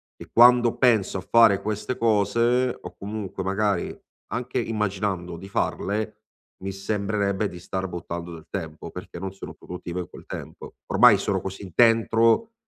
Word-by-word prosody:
e - - -12
quando 120 0 +6
penso 110 -7 +3
a - - -7
fare 115 -4 +6
queste 105 +4 -3
cose, 115 +3 +2
o - - -9
comunque 100 -2 -5
magari, 100 -1 0 0.4
anche 125 +2 -2
immaginando 100 -6 -2
di 95 - -10
farle, 105 +2 -1 0.5
mi 95 - -3
sembrerebbe 100 0 -1
di 90 - -10
star 95 +2 -4
buttando 85 0 -6
del 80 -1 -11
tempo 80 -4 -6
perché, 90 0 -8
non 95 +1 -4
sono 95 - -9
produttivo 90 0 -7
in 90 - -5
quel - - -13
tempo. - - -8
Ormai - - +6
sono - - 0
così 95 0 -7
dentro, 115 - +4
100 Hz, 150 wpm, -25 LUFS, 95-115 Hz, 0.5 s, quando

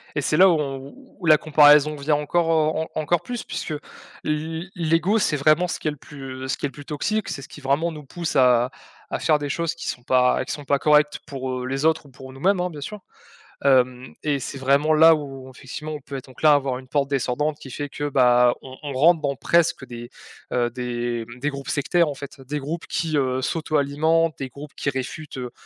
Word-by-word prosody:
Et 145 - 0
c'est 150 +2 +1
là 190 +1 +8
où 165 - +3
on 135 -1 -4 0.3
où 180 - -7
la 155 -1 +8
comparaison 150 0 +5
vient 150 +1 +1
encore, 165 +3 0
heu, 160 0 +1
en 155 - 0
encore 160 +2 +1
plus 240 +5 -5
puisque - - -5
l 150 - -4 0.5
l 160 +3 -3
l'ego, 170 +5 +2
c'est 155 -7 +1
vraiment 155 +5 +3
ce - - -4
qui - - -4
est - - +2
le 150 - -9
plus 135 -2 -8
ce - - -1
qui - - -3
est - - -1
le - - -18
plus 145 - -11
toxique. 210 +9 -2
C'est 140 - -4
ce 130 - -10
qui 150 - -12
vraiment 145 +5 +1
nous 150 -2 -9
pousse 165 +3 -5
à 125 -2 +4 0.4
à - - -1
faire 150 - +2
des 145 -1 -4
choses 170 +2 -1
qui 170 - -5
sont 125 - -5
pas 125 0 +3
qui - - -4
sont 145 - -7
pas 140 0 +1
correctes 150 0 +3
pour, 130 -2 -4
heu, 125 0 -3
les 135 +2 -2
autres 160 -1 +2
ou - - -15
pour 130 0 -12
nous-mêmes, 180 +8 +1
hein, 180 - -1
bien 155 -4 -9
sûr. 210 +7 -7 0.6
Hem 130 -2 +2
et 145 -2 0
c'est 135 +2 -6
vraiment 140 +4 +3
là 160 +1 +7
où, 135 -3 -7
effectivement, 150 +5 -7
on 150 - -6
peut 135 +1 -6
donc 130 - -15
là 155 -1 +7
avoir 135 -3 0
une 130 - -14
pente 140 0 +1
descendante 145 +3 -1
qui 135 - -11
fait 145 +3 -4
que 145 +1 -3
bah, 125 -2 +5
on 130 -1 -10
on 145 -1 -4
rentre 160 +5 +4
dans 140 -1 -1
presque 170 -5 +2
des, 120 -1 -9 0.4
heu, 120 -1 +1
des 120 -1 -3
des 145 +4 -1
groupes 140 -1 -7
sectaires, 165 +3 +2
en 145 - -5
fait. 140 0 -10
Des 145 +3 -4
groupes 155 +4 -5
qui, 160 -2 -1
heu, 130 -2 0
s'auto-alimentent, 155 +2 +1
des 135 -1 -4
groupes 145 +2 -11
qui - - -1
réfutent, 135 +2 -5
heu 125 -1 -5
145 Hz, 235 wpm, -23 LUFS, 130-155 Hz, 0.6 s, là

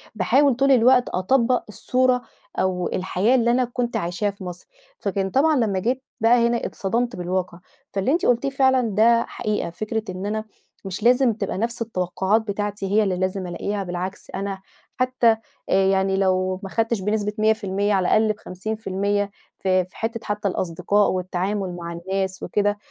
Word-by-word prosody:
باحاول 270 +5 +3
طول 275 +2 +3
الوقت 250 0 +5
أطبَّق 240 +6 +2
الصورة 250 +3 +1 0.4
أو 180 -2 0
الحياة 190 +6 +1
اللي 235 -1 +3
أنا 250 +1 +2
كنت 240 0 -2
عايشاها 175 +5 -1
في 200 0 -12
مصر، 180 -1 -8 0.3
فكان 195 -1 -1
طبعًا 300 +7 +3
لمّا 215 -7 +1
جيت 250 +7 -1 0.2
بقى 235 +1 +5
هنا 235 0 -1
اتصدمت 235 +5 -1
بالواقع، 180 0 -3 0.3
فاللي 195 +7 0
أنت 345 +3 +1
قُلتيه 245 +3 +2
فعلًا 265 -1 +3
ده 230 +2 +4
حقيقة، 215 -6 -2
فكرة 215 +5 -3
إن 185 +1 -5
أنا 215 +1 -2 0.4
مش 190 +2 -5
لازم 245 0 +4
تبقى 205 -3 -3
نَفْس 235 +3 -2
التوقعات 190 0 0
بتاعتي 205 -1 -3
هي 215 +1 +4
اللي 195 -3 0
لازم 185 0 -2
ألاقيها 200 +3 -3
بالعكس، 180 +1 -5
أنا 195 0 -4 0.4
حتى 255 -3 +3 0.3
يعني 190 0 +2
لو 185 -1 +1
ما 195 - -5
خدتِش 225 0 0
بنسبة 210 +1 -1
100% 210 -2 +1
على 190 -2 +2
الأقل 215 0 +3
ب50% 205 0 -2 0.3
في 185 -1 +2
في 185 - -20
حتة 230 +1 -2
حتى 210 -1 -2
الأصدقاء 185 +3 +1
والتعامل 185 +1 -2
مع 170 -1 -6
الناس 190 +2 -3
وكده، 205 0 0
205 Hz, 160 wpm, -23 LUFS, 190-235 Hz, 0.4 s, الوقت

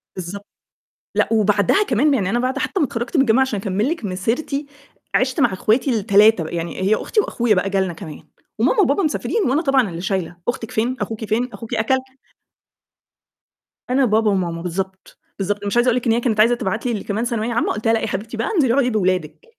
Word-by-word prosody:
بالضبط. 190 +3 -7 0.7
لأ - - +3
وبعدها 210 - +3
كمان 295 - +2
يعني 200 -8 0
أنا 240 +4 +1
بعد 260 +2 -1
حتّى 385 - -1
ما 300 - +3
اتخرّجت 240 +5 -5
من - - +6
الجامعة 245 0 +3
عشان 265 -6 0
أكمِّل 200 +6 -1
لِك 330 -9 -3
مسيرتي، 240 +10 -2 0.5
عِشْت 255 +5 +1
مع 190 - +3
أخواتي 225 +8 +1
ال3، 205 -2 +4
يعني 170 +2 -4
هي 200 +3 +3
أختي 430 - -1
وأخويا 240 - +1
بقى 185 +2 0
جالنا 190 -2 0
كمان 155 -2 -10 0.4
وماما 480 - +3
وبابا 350 +1 +2
مسافرين 395 +8 0
وأنا 285 +5 +2
طبعًا 270 - +2
اللي 170 0 -6
شايلة، 185 -2 -2
"أختِك 235 -2 -3
فين؟ 235 +4 0
أخوكِ 220 +2 -4
فين؟ 235 +4 0
أخوكِ 230 0 -8
أكل؟" 225 +4 +2 1.9
أنا 260 +1 +3
بابا 220 -1 +2
وماما، 175 -4 -1
بالضبط، 190 +2 -5 0.2
بالضبط، 205 +1 -2
مش 200 +3 -1
عايز 240 +1 +3
أقول 245 0 +3
لِك 250 - -2
إن - - +4
هي 235 - +2
كانت 235 -3 -1
عايزة 230 +3 +5
تبعت 220 -2 -3
لي 230 -5 -2
كمان 205 - -3
اللي 240 - -1
ثانوية 235 0 -2
عامة، 235 - 0
قُلت 215 - -7
لها: 225 - +4
"لأ، 225 - +2
يا - - -3
حبيبتي 215 +3 -4
بقى 225 - -1
انزلي 265 -9 +3
أقعدي 265 -1 +2
بأولادِك." 185 - -1
220 Hz, 210 wpm, -20 LUFS, 195-250 Hz, 1.9 s, من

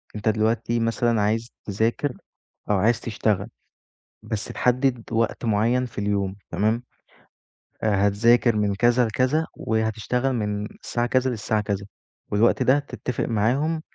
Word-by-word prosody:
أنت 105 +1 0
دلوقتي 110 +2 +1
مثلًا 115 0 +1
عايز 110 +3 0
تذاكر 115 +7 -1 0.5
أو 105 - +3
عايز 110 +4 +2
تشتغل 105 -3 -1 0.8
بس 110 0 -3
تحدد 125 -1 +1
وقت 115 +1 0
معيّن 115 +4 +2
في 120 - -13
اليوم 100 -2 -1
تمام؟ 110 +4 0 1.0
آآ 100 -2 +3
هتذاكر 115 +3 +4
من 105 -1 +1
كذا 120 +3 +3
لكذا 130 +8 +1
وهتشتغل 110 +4 -1
من 105 -3 -2 0.2
الساعة 120 0 -1
كذا 130 +1 +2
للساعة 110 -1 -1
كذا 100 -1 -3 0.5
والوقت 105 +3 +3
ده 135 +3 +4
تتفق 125 -3 -4
معاهم 135 +9 +1
115 Hz, 130 wpm, -24 LUFS, 105-125 Hz, 1.0 s, هتذاكر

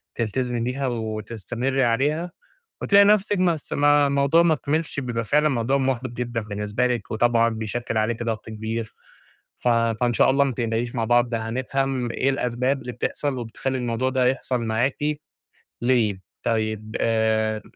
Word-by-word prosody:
تلتزمي 120 +2 -1
بيها 130 +3 -2
وتستمرّي 115 +3 -2
عليها 145 +9 +1 0.5
وتلاقي 200 0 +6
نَفْسِك 205 0 +3
ما 180 -2 +3
اس 155 - -7
ما 145 0 +4
الموضوع 140 +4 +3
ما 165 -2 +4
كمِلش، 150 +1 -2
بيبقى 120 -4 -2
فعلًا 150 +7 +2
موضوع 130 0 +1
محبِط 130 -1 -1
جدًا 120 -1 -3
بالنسبة 105 +3 -1
لِك 120 -4 -3
وطبعًا 115 +1 +3
بيشكّل 110 +1 -3
عليكِ 110 +2 0
ضغط 115 -2 -3
كبير 110 +1 -4 0.7
ف - - -2
فإن 115 0 +2
شاء - - +4
الله 135 +1 +4
ما 140 - 0
تقلقيش 115 0 -2
مع 115 -2 0
بعض 120 +1 +2
هنفهَم 125 +2 -1
إيه 135 - 0
الأسباب 130 +1 0
اللي 125 0 -6
بتحصَل 140 +2 -2
وبتخلّي 125 +3 -3
الموضوع 125 +1 -1
ده 130 -1 +1
يحصَل 130 0 0
معاكِ 115 +4 0 0.8
ليه. 115 -6 +1 0.2
طيب 110 -1 -2
آآ، 110 -1 +1
120 Hz, 150 wpm, -23 LUFS, 115-135 Hz, 0.8 s, وتلاقي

